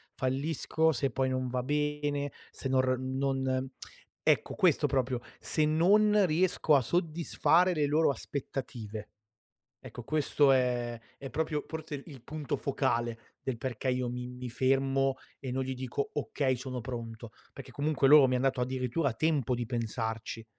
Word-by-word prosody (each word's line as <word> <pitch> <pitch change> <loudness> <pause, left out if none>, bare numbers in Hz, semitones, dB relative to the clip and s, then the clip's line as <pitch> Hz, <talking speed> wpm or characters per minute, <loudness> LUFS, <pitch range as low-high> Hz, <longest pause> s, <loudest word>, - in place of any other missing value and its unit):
fallisco, 150 +4 +1
se 135 -1 0
poi 130 +2 0
non 130 0 -1
va 125 0 -1
bene, 145 0 -1 0.2
se - - -5
nor 130 -1 +2
non" 130 0 -1 0.6
ecco, - - +2
questo - - +3
proprio, 130 -2 0 0.2
se 155 - 0
non 200 +6 +4
riesco 165 -1 +3
a 135 - +5
soddisfare 170 +3 +2
le 150 -3 +1
loro 155 +2 +3
aspettative. 120 -7 -6 0.8
Ecco 120 - -8
questo 145 0 +3
è 120 -2 +1 0.2
è 135 - -7
proprio, 155 -1 -2
forse 155 -3 -5
il 135 -6 -12
punto 155 0 -3
focale, 120 -4 -1 0.2
del 130 -3 -3
perché 130 0 -3
io 125 -1 -1
mi 125 0 -4
mi 125 0 -7
fermo 135 +1 +2 0.2
e 130 - -5
non 130 +1 -1
gli 130 0 -3
dico: 130 +2 -3
"Okay 135 -2 0
sono 130 -1 -5
pronto," 115 -2 -6 0.2
perché 135 -1 -10
comunque 145 0 +1
loro 150 -3 +9
mi 130 - +1
han 125 - +1
dato 135 -1 +1
addirittura 130 +2 0
tempo 140 -2 +1
di 120 0 -3
pensarci. 115 -1 -3
130 Hz, 150 wpm, -30 LUFS, 125-150 Hz, 0.8 s, loro